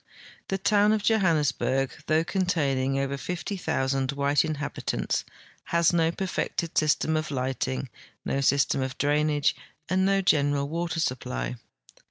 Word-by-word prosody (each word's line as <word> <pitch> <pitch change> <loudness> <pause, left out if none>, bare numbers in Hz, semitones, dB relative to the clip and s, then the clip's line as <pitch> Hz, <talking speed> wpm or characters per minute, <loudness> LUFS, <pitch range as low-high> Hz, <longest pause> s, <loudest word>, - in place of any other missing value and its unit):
The 195 - -1
toAvn 210 +2 +3
of 210 - -3
Johannesburg, 150 - +2 0.2
though 155 +1 +3
containing 140 -8 0
over 135 0 -1
50,000 135 -6 -2
Avhite 140 +1 +2
inhabitants, 150 -3 -2 0.4
has 170 0 +2
no 165 -1 +3
perfected 175 -2 -3
system 155 +1 +2
of 155 0 -1
lighting, 130 - -2 0.4
no 135 - 0
system 140 0 +2
of 130 -1 -3
drainage, 150 0 +2 0.3
and 185 +1 +1
no 195 0 +2
general 145 -5 +2
Avater 165 +2 -2
supply. 60 - -2
150 Hz, 125 wpm, -26 LUFS, 135-175 Hz, 0.4 s, toAvn